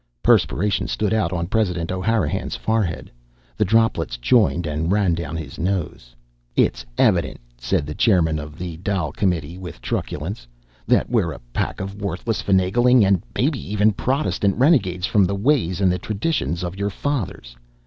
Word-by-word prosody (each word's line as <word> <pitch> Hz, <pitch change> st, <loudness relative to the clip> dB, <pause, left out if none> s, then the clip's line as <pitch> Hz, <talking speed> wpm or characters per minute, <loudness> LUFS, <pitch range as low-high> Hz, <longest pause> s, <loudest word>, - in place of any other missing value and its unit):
Perspiration 100 Hz, +3 st, +2 dB
stood 105 Hz, -2 st, -1 dB
out 110 Hz, -6 st, +1 dB
on 85 Hz, -2 st, -1 dB
President 90 Hz, -4 st, -1 dB
O'Hanrahan's 95 Hz, -3 st, -1 dB
forehead. 110 Hz, -6 st, -1 dB, 0.4 s
The 105 Hz, -, +1 dB
droplets 110 Hz, -, +1 dB
joined 90 Hz, -, +2 dB
and 80 Hz, +3 st, -1 dB
ran 100 Hz, -4 st, +2 dB
down 85 Hz, -2 st, -4 dB
his 75 Hz, -4 st, -8 dB
nose. 85 Hz, -9 st, -3 dB, 0.4 s
"It's -, -, +2 dB
evident," -, -, +2 dB, 0.2 s
said -, -, 0 dB
the 75 Hz, -, -5 dB
chairman 80 Hz, -5 st, +2 dB
of 75 Hz, +1 st, -8 dB
the 85 Hz, -2 st, -6 dB
Dail 90 Hz, -4 st, -2 dB
Committee, 85 Hz, -2 st, -1 dB
with 90 Hz, -4 st, -8 dB
truculence, 75 Hz, -, -4 dB, 0.4 s
"that -, -, +3 dB
we're -, -, +1 dB
a -, -, -10 dB
pack -, -, -2 dB
of 100 Hz, +2 st, -6 dB
worthless, 100 Hz, +3 st, -2 dB
finagling' 105 Hz, +5 st, +4 dB
and 95 Hz, -3 st, +3 dB
maybe 135 Hz, +5 st, +1 dB
even 105 Hz, +1 st, +1 dB
Protestant 115 Hz, -4 st, 0 dB
renegades 110 Hz, -, +3 dB
from 100 Hz, 0 st, +3 dB
the 100 Hz, -, -1 dB
ways 100 Hz, -, +1 dB
an' 95 Hz, -, +4 dB
the 90 Hz, -, -1 dB
traditions 100 Hz, -, -2 dB
of 90 Hz, +1 st, -4 dB
your 100 Hz, 0 st, 0 dB
fathers! 100 Hz, -, -4 dB
95 Hz, 160 wpm, -22 LUFS, 85-110 Hz, 0.4 s, finagling